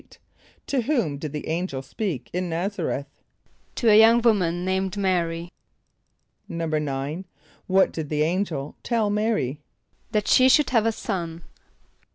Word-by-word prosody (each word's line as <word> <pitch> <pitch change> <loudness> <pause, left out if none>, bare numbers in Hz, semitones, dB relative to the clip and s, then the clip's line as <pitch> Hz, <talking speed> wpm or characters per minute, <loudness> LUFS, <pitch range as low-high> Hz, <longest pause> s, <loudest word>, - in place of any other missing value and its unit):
= - - -31
To 270 -3 0
whom 225 - 0
did 150 -1 -5
the 150 0 -5
angel 160 -5 -2
speak 135 - -4
in 180 0 -2
N[)a]z´a 180 +3 -2
r[)e]th? 140 - -3 0.7
=To 235 - 0
a 210 - +8
young 225 +2 +7
woman 180 -6 +2
named 190 +1 -1
M[=a]´r[)y].= 175 -3 -1 1.0
=9.= 155 0 -2 0.4
What 190 0 +4
did 155 -3 -5
the 150 -1 +1
angel 165 -4 -2
tell 225 -4 0
M[=a]´r[)y]? 210 - 0 0.5
=That 210 -2 0
she 255 0 +6
should 295 +2 +4
have 225 -3 +3
a - - +3
son. 170 -6 -4
180 Hz, 145 wpm, -24 LUFS, 155-210 Hz, 1.0 s, a